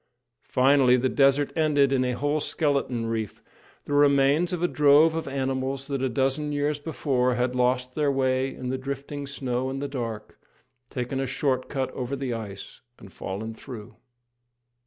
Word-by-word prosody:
Finally, 130 -1 +5
the 130 +1 +1
desert 140 +1 +3
ended 145 -4 +3
in 130 -1 +2
a 125 0 0
whole 145 +4 0
skeleton 140 -6 0
reef 110 -2 -3 0.4
the 145 - -5
remains 145 +4 +4
of 175 -1 -2
a - - +4
drove 150 +1 +5
of 165 -2 -3
animals 135 0 -2
that 140 -2 -3
a 130 - +1
dozen 135 +4 0
years 145 0 0
before 135 -5 0
had 125 0 0
lost 125 0 +1
their 150 -1 +1
way 130 0 +1
in 125 - -6
the 130 0 -2
drifting 140 +1 -5
snow 130 -2 -2
and 135 +1 -4
the 140 - -3
dark, 115 -6 -6 0.5
taken 125 +1 -3
a 135 - -1
short 130 0 -1
cut 135 -2 -2
over 130 +2 -4
the 135 -2 -3
ice, 105 -2 -8 0.2
and 95 - -14
fallen 105 +4 -5
through. 115 -1 -10
135 Hz, 170 wpm, -26 LUFS, 125-145 Hz, 0.5 s, Finally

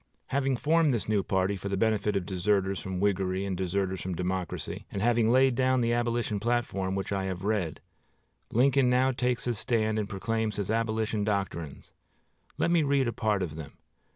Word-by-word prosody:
Having 135 -1 +1
formed 155 -1 +3
this 115 - -3
new 105 -2 +2
party 95 +1 0
for 100 +1 -5
the 100 - -1
benefit 105 -1 +1
of 95 -2 -1
deserters 95 0 0
from 95 -2 -4
Whiggery 95 -1 0
and 95 -2 -2
deserters 95 +1 -1
from 95 -1 -3
Democracy, 90 0 -3
and 100 - -3
having 115 +1 +3
laid 130 +1 +5
down 130 +1 +2
the 120 0 +1
Abolition 120 -3 0
platform 100 -5 -1
which 95 0 -3
I 95 -1 -1
have 95 -1 -4
read, 100 -7 -1 0.7
Lincoln 130 +2 +4
now 130 +1 +3
takes 125 -1 -1
his 120 -4 -1
stand 110 -1 0
and 105 -1 -3
proclaims 110 +2 -2
his 100 0 -2
Abolition 110 -1 0
doctrines. 95 -8 -3 0.7
Let 170 - +1
me 170 -2 +4
read 140 -3 +2
a 120 - -1
part 105 -4 0
of 80 -4 -4
them. 80 -2 -8
105 Hz, 185 wpm, -28 LUFS, 95-120 Hz, 0.7 s, laid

